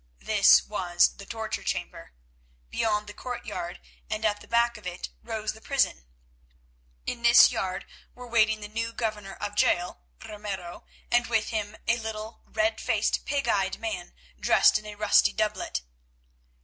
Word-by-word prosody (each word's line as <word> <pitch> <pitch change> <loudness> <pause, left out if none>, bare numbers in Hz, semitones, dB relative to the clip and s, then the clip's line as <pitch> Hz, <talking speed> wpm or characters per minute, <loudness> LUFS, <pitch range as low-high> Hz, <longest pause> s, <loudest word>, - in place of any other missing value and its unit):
This 65 +1 +5
was 175 - +1
the 200 - -11
torture 220 -1 -4
chamber. - - -4 0.6
Beyond 210 - +1
was - - -25
the - - -8
courtyard, 235 -8 -5 0.3
and 215 0 -2
at 205 -1 +1
the - - -14
back 235 0 +2
of 210 -4 -9
it 180 0 -5
rose 220 -2 -3
the 220 - -15
prison. 255 - 0 1.0
In 235 - -3
this 235 +1 +8
yard 185 -1 -3 0.3
were 250 - -10
waiting 220 -2 +2
the 210 - -6
new 230 +2 -3
governor 210 -4 -3
of 205 - -4
the 205 - -15
jail, 175 - +1 0.3
Ramiro, 195 -4 -6 0.3
and 240 0 +3
with 225 -2 +1
him 215 -1 -3
a 235 - +2
little 220 0 -6
red 325 +1 0
faced, - - 0
pig 280 -1 -1
eyed 195 -1 +1
man 210 -6 -5 0.2
dressed - - +5
in 215 - -12
a 210 - -7
rusty 210 0 +4
doublet. 215 - -2
215 Hz, 160 wpm, -27 LUFS, 195-230 Hz, 1.0 s, this